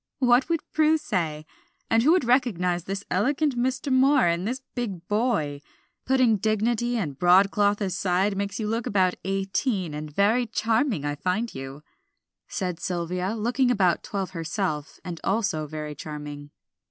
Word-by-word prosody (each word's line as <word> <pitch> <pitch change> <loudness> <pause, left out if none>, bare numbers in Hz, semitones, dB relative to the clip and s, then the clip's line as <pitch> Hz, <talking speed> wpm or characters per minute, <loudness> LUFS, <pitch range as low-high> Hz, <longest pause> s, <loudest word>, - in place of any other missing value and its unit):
"What 250 +2 +3
would 330 -2 +1
Prue 310 +1 +4
say? 165 - -2 0.4
and 225 - +3
who 290 +7 +4
would 360 -4 +4
recognize 180 - +1
the 195 0 -3
elegant 270 - +1
Mr. 260 +2 -1
Moor 265 +1 +5
in 170 +2 +1
this 255 +4 -3
big 195 -9 -4
boy? 205 - 0 0.5
Putting 255 -4 +4
dignity 225 +3 0
and 150 -10 -3
broadcloth 200 +3 +4
aside 190 +1 0
makes 200 +1 -3
you 215 - -2
look 225 +2 -2
about 185 -2 +2
eighteen, 195 - -1
and 150 +1 -5
very 215 +9 +2
charming 225 - 0
I 145 - -1
find 185 +10 -2
you," 135 +2 -8 0.6
said 180 -4 -3
Sylvia, 180 +3 -2
looking 245 +4 +1
about 190 -8 +2
twelve 195 -2 -4
herself, 165 -3 -3
and 175 -3 -6
also 195 -7 0
very 150 0 -5
charming. 145 -1 -8
200 Hz, 150 wpm, -25 LUFS, 170-240 Hz, 0.6 s, Moor